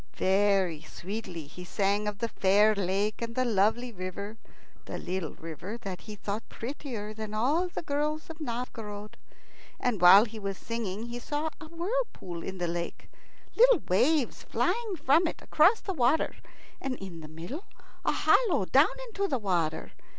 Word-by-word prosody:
Very 190 -4 +3
sweetly 180 -4 -6
he 170 +5 -10
sang 200 +3 0
of 210 -1 -2
the 230 - -1
fair 205 +1 +4
lake 200 +2 0
and 230 0 -4
the 255 - +2
lovely 230 +3 +2
river 200 +2 -6 0.5
the - - -5
little 180 -3 -3
river 165 +7 -7
that 195 -6 -6
he 215 - -8
thought 205 +1 -3
prettier 230 -4 -5
than 215 -1 -5
all 290 +11 +2
the 350 - -5
girls 300 +2 -1
of 325 0 -9
Novgorod. 225 -5 -5 0.6
And 230 -7 0
while 195 +5 +9
he 220 -1 -8
was 195 -2 -3
singing 225 -2 -4
he 240 +1 -5
saw 295 +5 -2
a 315 - -9
whirlpool 335 - -3
in 190 +2 -5
the 175 -1 -1
lake, 170 0 -4 0.4
little - - +6
waves 260 - +2
flying 385 - 0
from 315 +2 +4
it - - -4
across 370 +9 +4
the 385 - -3
water, 265 +1 +2 0.5
and 265 -1 -2
in 190 -6 -8
the 155 - -8
middle 170 - -7 0.4
a - - +2
hollow 470 -7 +3
down - - +5 0.2
into 400 -2 -1
the 275 - 0
water. 175 -7 -1
215 Hz, 165 wpm, -29 LUFS, 190-290 Hz, 0.6 s, while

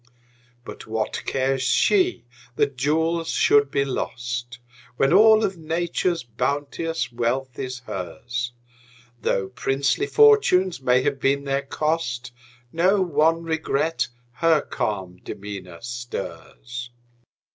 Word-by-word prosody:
But - - -9
what 110 0 -2
cares 135 0 0
she 130 - +2 0.3
that 140 0 +1
jewels 160 +5 0
should 145 -1 +4
be 140 0 +1
lost, 120 -2 -4 0.4
When 135 +5 +3
all 220 +2 +7
of 190 -3 -1
Nature's 170 0 -1
bounteous 140 +4 -2
wealth 120 +2 -2
is 130 -1 -4
hers? 120 +5 -4 0.7
Though 95 0 0
princely 140 - 0
fortunes 410 - +4
may 125 0 +3
have 135 - 0
been 140 +2 +1
their 140 0 0
cost, 140 -4 -2 0.4
Not 185 +2 +2
one 160 +3 +3
regret 160 -1 0 0.3
her 165 -3 +4
calm 95 -4 -3
demeanor 95 -3 -8
stirs. 120 0 -6
135 Hz, 110 wpm, -23 LUFS, 120-165 Hz, 0.7 s, all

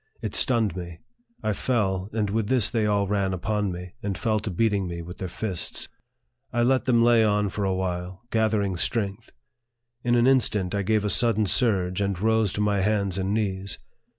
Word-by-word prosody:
It - - -5
stunned 115 -7 +2
me. 85 -2 -7 0.5
I 110 - 0
fell, 95 -5 -1
and 105 -2 -1
with 110 -1 0
this 125 -4 +3
they 110 -3 +1
all 100 -1 +2
ran 95 -2 0
upon 105 +2 -1
me, 90 0 -8
and 100 -2 -3
fell 110 -2 0
to 105 - -5
beating 100 0 0
me 85 -1 -5
with 90 +2 -10
their 95 - -3
fists. 90 0 -2 0.6
I 120 - +1
let 130 +1 +2
them 120 -3 +3
lay 120 -1 +5
on 105 -1 +1
for 100 +1 -3
a 95 - +1
while, 90 +1 -4
gathering 110 -4 +1
strength. 100 +3 -1 0.7
In 120 0 +2
an 120 0 +4
instant, 105 -8 +2
I 100 - 0
gave 105 +1 +1
a - - +1
sudden 115 -3 +4
surge, 95 -4 +1
and 100 -2 -1
rose 110 -1 +2
to 105 - -2
my 105 -1 +1
hands 100 -2 0
and 95 +1 -1
knees. 100 -3 -2
105 Hz, 195 wpm, -25 LUFS, 95-110 Hz, 0.7 s, lay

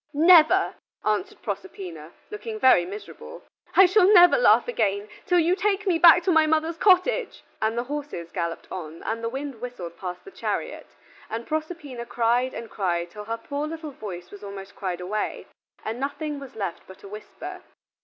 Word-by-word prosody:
"Never" 340 +4 +6 0.3
answered 370 - -1
Proserpina, 170 - -6 0.2
looking 435 +1 -6
very 215 - +5
miserable. 455 - -9 0.3
"I 385 - +9
shall 370 +1 +5
never 355 -3 +8
laugh - - +5
again, 205 - -1 0.2
till 355 - +3
you 345 +2 +3
take 415 +1 0
me 350 -4 +2
back 345 0 +8
to 370 - +2
my 320 -2 +4
mother's 320 +1 +1
cottage." 420 +6 +2 0.2
And 220 +1 0
the 240 - 0
horses 275 - -6
galloped 170 -3 -4
on, 165 -3 -7
and 230 +1 -3
the 230 - -1
wind 270 -2 -6
whistled 185 -9 -7
past 180 -1 -6
the 390 - -11
chariot, - - -4 0.4
and 230 +1 -4
Proserpina 305 -6 -5
cried 245 +2 +1
and 230 - -6
cried 175 -5 -2
till 210 +1 -9
her 225 +1 -3
poor 285 +5 -4
little 315 -1 -6
voice 180 -8 -8
was 205 0 -11
almost 200 -1 -9
cried 180 -2 -4
away, 210 +4 -3 0.4
and 225 +2 -4
nothing 285 +2 -3
was 275 -2 -11
left 195 -6 -4
but 190 - -14
a - - -9
whisper. 210 +2 -9
250 Hz, 175 wpm, -25 LUFS, -, 0.4 s, I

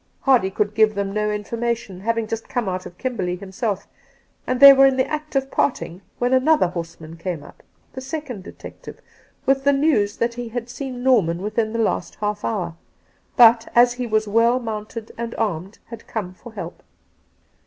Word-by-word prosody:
Hardy 255 -8 +3
could 205 +2 -1
give 215 -1 +3
them 200 -1 -2
no 210 0 0
infor 210 +2 -4
mation, 235 -6 -3
having 230 +1 0
just 225 +1 -5
come 240 -4 -2
out 185 -1 -3
of 180 0 -15
KimbBrley 190 -9 -3
himself, 200 +1 -3 0.6
and 255 0 0
they 280 0 +11
were 270 0 +6
in 265 -1 +1
the 260 - +3
act 305 0 -5
of 270 0 0
parting 185 -9 -1 0.2
when 245 +1 +1
another 260 - +4
horseman 165 -2 -7
came 165 -3 -4
up - - -15 0.2
— - - -38
the 260 - -6
second 265 -6 -6
detective - - -11 0.2
— - - -36
with 270 0 +2
the 280 +1 +4
news 275 -8 +2
that 235 0 0
he 240 -1 -6
had 240 +1 -5
seen 255 -2 -6
Norman 200 -11 +3
within 215 +3 -1
the 230 - -3
last 225 - -1
half 210 0 -3
hour, 190 -7 -2 0.6
but, 230 -2 +6
as 240 0 +6
he 245 0 -4
was 215 -1 +1
well 230 +4 +3
mounted 220 -1 -6
and 235 0 -4
armed, 195 -2 -3
had 230 -1 -10
come 195 -5 -4
for 230 +5 -13
help. - - -7
225 Hz, 195 wpm, -22 LUFS, 200-250 Hz, 0.6 s, they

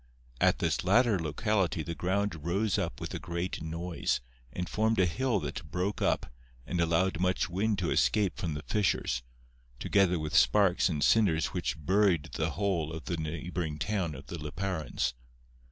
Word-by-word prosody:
At - - +4
this - - 0
latter 120 -5 +4
locality 85 +2 0
the 85 - -4
ground 95 -2 -1
rose 95 +5 +1
up - - -3
with - - -5
a - - -3
great 85 +1 -4
noise 85 +2 -2 0.3
and 90 -1 -4
formed 110 +3 +1
a 95 - +5
hill 115 +5 0
that 75 - -5
broke 90 +4 -2
up - - 0 0.3
and 90 -1 -1
allowed 85 +1 +2
much 90 0 +1
wind 105 +3 +1
to 90 -3 -1
escape 105 -4 +2
from 80 -4 -2
the 75 - -5
fissures, 95 - 0 0.6
together 95 -3 +3
with 75 -2 -3
sparks 95 +5 +4
and 75 -4 -1
cinders 90 -7 +3
which 90 -2 -1
buried 95 -4 +3
the 80 0 0
whole 90 -6 0
of 80 -3 -7
the 85 - -2
neighboring 80 0 -3
town 85 -2 -1
of 65 +1 -10
the 85 +4 -6
Liparans. 80 -2 -2
90 Hz, 170 wpm, -30 LUFS, 80-100 Hz, 0.6 s, a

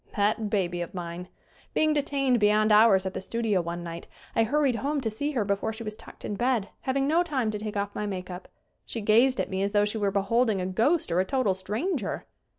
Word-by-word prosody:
That 210 +1 +1
baby 180 -4 0
of 175 - -6
mine! 175 0 -5 0.5
Being 310 0 +3
detained 275 -4 +1
beyond 210 +1 +3
hours 210 -3 +6
at 190 - -3
the - - -4
studio 220 -2 0
one 170 +1 -5
night 170 0 -7 0.3
I - - +4
hurried 275 0 +1
home 290 +3 -1
to 225 -3 -2
see 285 +8 -2
her 230 -6 0
before 200 +2 -1
she 225 +1 -7
was 215 -1 -5
tucked - - -12
in - - -3
bed, 235 -1 0
having 270 +1 0
no 325 +4 +3
time 270 -10 -1
to 210 - -4
take 210 -1 -4
off 200 0 -2
my 210 - -3
make 185 -2 -5
up. 180 +1 -8 0.4
She 230 - -5
gazed 235 +5 +4
at - - -2
me 190 0 -1
as 200 +1 -1
though 205 0 +4
she 210 +1 -2
were 200 -1 +1
beholding 205 +2 +1
a 180 - -2
ghost 230 - +1
or 170 - +2
a - - +4
total 255 -4 +1
stranger! 210 - -3
215 Hz, 235 wpm, -27 LUFS, 195-250 Hz, 0.5 s, hours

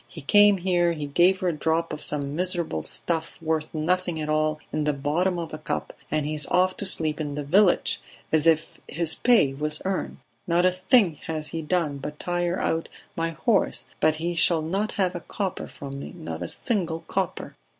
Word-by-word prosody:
He - - -10
came 205 -1 +6
here, 175 -2 +2
he 150 -3 -4
gave 175 +6 +3
her 185 - +2
a - - -1
drop 160 +2 0
of - - -6
some 145 -1 -1
miserable 175 - -1
stuff 165 - -3
worth 160 -1 -1
nothing 170 +1 0
at 155 0 -3
all 155 0 +1 0.2
in 155 -1 0
the 150 - +2
bottom 160 +7 0
of 165 -2 -5
a 155 - -5
cup, 155 - -4 0.2
and 155 -1 0
he 155 - -2
is 150 -2 +1
off 185 +1 +2
to 200 - -3
sleep 155 -3 0
in 145 -2 -3
the 145 - -3
village 185 +6 +3 0.3
as 155 0 +3
if 160 -1 +1
his 160 +1 +1
pay 225 - +4
was 150 +2 -2
earned! 190 0 -2 0.3
Not 175 +1 +3
a 185 - +5
thing 185 - +3
has 155 -1 -3
he 165 - -4
done 155 -3 -1
but 150 +2 -6
tire 175 +1 -1
out 165 0 -1 0.3
my 165 0 -1
horse, 195 +5 +1
but 155 0 +3
he 170 +2 -2
shall 165 -1 +4
not 195 +7 -1
have 185 -3 +1
a 175 - -4
copper 195 +1 -4
from 140 -1 -8
me, - - -8
not 80 +1 -6
a 90 - -3
single 170 - -1
copper..." - - -3
165 Hz, 205 wpm, -25 LUFS, 150-180 Hz, 0.3 s, came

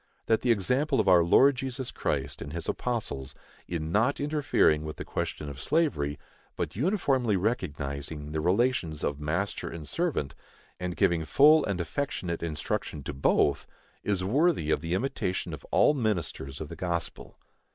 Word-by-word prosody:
That 110 -1 +2
the 125 - 0
example 125 - +1
of 105 - +1
our 90 -2 +7
Lord 135 +11 +5
Jesus 130 0 -4
Christ - - -2
and 70 +1 -6
his 85 - -4
apostles, 75 - -3 0.3
in 80 -2 -3
not 115 +9 +2
interfering 145 - +2
with 75 0 -5
the - - -7
question 75 - -3
of 70 -2 -7
slavery, 105 - +1 0.4
but - - -3
uniformly 135 - +1
recognizing 75 - -3
the 80 0 -1
relations 90 -4 +1
of 70 0 -1
master 85 +7 -2
and 80 -3 -7
servant, 160 - -1 0.5
and 90 -1 -4
giving 85 -5 +2
full 150 - +6
and 100 -6 -2
affectionate 85 - -3
instruction 75 -2 -3
to 70 - -5
both, 70 +1 +2 0.4
is 100 -3 0
worthy 135 - +2
of - - +1
the 85 +2 -1
imitation 95 -5 -2
of - - -8
all - - +4
ministers 90 - -2
of 80 - -6
the - - -7
gospel. 85 -2 -4
90 Hz, 160 wpm, -28 LUFS, 75-125 Hz, 0.5 s, our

